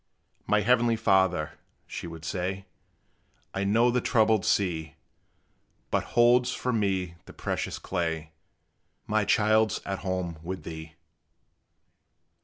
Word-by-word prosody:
"My 105 0 +3
heavenly 120 +1 +3
Father," 95 -7 +1 0.3
she - - -7
would 80 -1 -9
say, 95 +3 -3 0.9
"I 95 - -1
know 115 +5 +3
the 125 0 +1
troubled 110 -5 +3
sea 80 -6 0 1.0
But - - +1
holds 120 +1 +5
from 125 -3 -1
me 95 -4 -1
the - - -12
precious - - -3
clay: 80 -4 -3 0.7
My 110 -1 +1
child 110 0 +3
's - - -4
at 95 -1 -3
home 90 -4 -3
with 90 +3 -6
thee!" 80 -1 -8
95 Hz, 120 wpm, -27 LUFS, 85-110 Hz, 1.0 s, holds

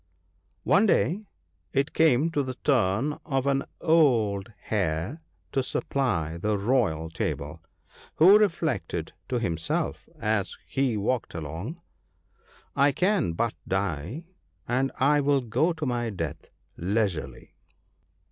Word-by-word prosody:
One 200 +4 +4
day 200 +2 +1 0.5
it 140 +2 0
came 160 0 +4
to 145 - +1
the 130 -2 -4
turn 130 +1 +1
of 135 -4 -1
an 135 -1 +2 0.2
old 115 - +3
hare 100 - -1 0.3
to 135 - +1
supply 95 - -1
the 105 +3 0
royal 100 -8 +1
table, - - -3 0.5
who 190 +6 +8
reflected 130 - -1 0.2
to 125 - 0
himself 85 -8 -2
as 105 -3 -1
he 135 -5 0
walked 110 0 -1
along, 85 - -6 0.5
' - - -31
I 145 - +5
can 185 - +1
but 115 +6 0
die, 95 - -2 0.4
and 130 +3 +1
I 145 +2 +4
will 140 -1 +2
go 125 +9 +1
to 160 -2 -4
my 120 -2 -1
death 85 -8 -5 0.3
leisurely.' 95 -2 -2
120 Hz, 120 wpm, -27 LUFS, 95-145 Hz, 0.5 s, who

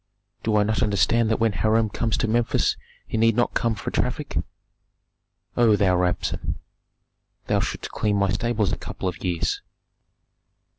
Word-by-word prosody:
do 110 -1 0
I 105 - +4
not 110 +1 0
understand 110 +2 +2
that 110 - +1
when 115 -1 +3
Hiram 110 +4 +2
comes 115 0 0
to - - 0
Memphis 115 +1 +1 0.3
he 110 - -2
need 115 -1 +4
not 120 0 +1
come 115 -1 +1
for - - -5
traffic? - - -2 1.2
O 115 -3 +5
thou 95 -3 +3
Rabsun! 90 0 -1 0.9
thou - - +1
shouldst - - -3
clean 105 -1 0
my 100 -2 +2
stables 110 -1 0
a - - -2
couple - - -5
of 90 -1 -4
years." 90 -3 -1
110 Hz, 155 wpm, -24 LUFS, 100-115 Hz, 1.2 s, O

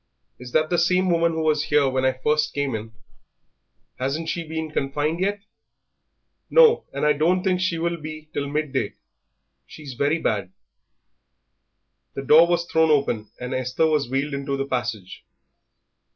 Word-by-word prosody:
"Is 125 0 -10
that 155 +1 +2
the 175 - +2
same 180 +1 +2
woman 170 0 +2
who 160 0 -2
was 155 -1 +1
here 145 -2 +3
when 130 0 0
I 130 - +3
first 150 +3 0
came 140 -2 -1
in? 110 0 -5 1.1
Hasn't 145 +5 -2
she 170 - -2
been 160 0 -5
confined 150 +3 -1
yet?" 200 +2 -1 1.1
"No, 470 -1 +5
and - - -2
I 150 - +4
don't 175 +5 +1
think 185 -2 +1
she 180 -2 0
will 170 +1 -1
be 155 0 -9
till 140 - -2
midday; 140 -6 -2 0.7
she's 145 -4 -10
very 145 +5 +1
bad." 100 - -2 1.6
The 135 - -4
door 160 +5 +6
was 175 0 0
thrown 160 -1 +2
open, 130 -8 +1
and 125 +1 -5
Esther 130 +4 0
was 150 -5 +1
wheeled 135 +3 -1
into 140 0 -3
the 135 - -2
passage. 115 -7 -4
150 Hz, 160 wpm, -23 LUFS, 135-165 Hz, 1.6 s, door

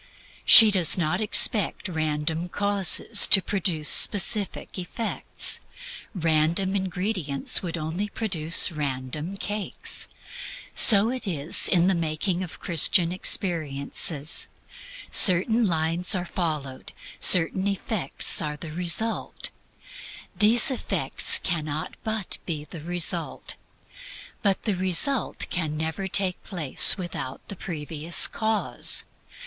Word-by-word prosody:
She 220 -1 +9
does 180 -5 +1
not 170 +2 -2
expect 210 0 0
random 160 0 -4
causes 205 +2 +4
to 195 - +7
produce 180 -6 -4
specific 205 -1 +3
effects 220 +5 -1 0.6
random 165 +3 0
ingredients 185 -6 -1
would 170 -2 -6
only 170 +6 -5
produce 170 -9 +2
random 150 +4 -6
cakes. 205 +1 -3 0.7
So 215 +1 +5
it 255 -4 -7
is 160 -3 +2
in 175 -2 +2
the 190 - +1
making 170 +2 -3
of 180 -3 -9
Christian 170 +1 +2
experiences. 155 -4 -1 0.6
Certain 215 +5 +5
lines 165 +3 -1
are 180 -1 -4
followed; 150 -7 -6 0.3
certain 185 +3 +4
effects 195 -5 -1
are 150 -1 -6
the 155 0 -11
result. 180 +7 -4 0.8
These 225 +5 +3
effects 260 - 0
cannot 155 -3 -5
but 220 -3 -3
be 155 -4 -6
the 165 0 -12
result. 175 +1 -5 0.9
But 200 -3 -1
the 210 -4 -2
result 190 +8 -2
can 155 -4 -4
never 160 +5 -5
take 190 -1 -1
place 165 -9 +4
without 170 -8 -8
the 200 - -8
previous 160 -1 -2
cause. 220 -1 -1
175 Hz, 110 wpm, -23 LUFS, 155-200 Hz, 0.9 s, She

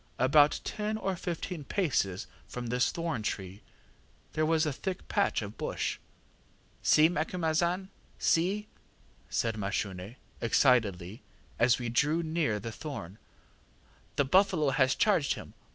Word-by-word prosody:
About 145 +4 +5
ten 215 +1 -2
or 195 -3 -2
fifteen 170 -1 -4
paces 130 - 0 0.2
from 125 -1 -6
this 125 +1 +1
thorn 165 -8 -2
tree 95 -2 -4 0.7
there 155 0 +1
was 160 0 +3
a 150 - -1
thick 190 +6 -5
patch 200 - +1
of 105 +1 -9
bush. - - -2 0.8
ŌĆ£ŌĆśSee, 155 +2 +5
Macumazahn! 170 +3 0 0.3
see! 195 +6 +1 0.6
ŌĆÖ - - -16
said 115 -1 +1
Mashune, 100 0 -3 0.3
excitedly, 110 -4 +2 0.4
as 120 +1 +5
we 120 -2 -3
drew 150 +8 +2
near 155 -10 0
the 115 +3 -6
thorn; 110 - -7 1.0
ŌĆśthe 140 -1 +1
buffalo 185 -6 +4
has 130 0 +3
charged 195 -9 +2
him. - - -10
145 Hz, 130 wpm, -30 LUFS, 115-170 Hz, 1.0 s, About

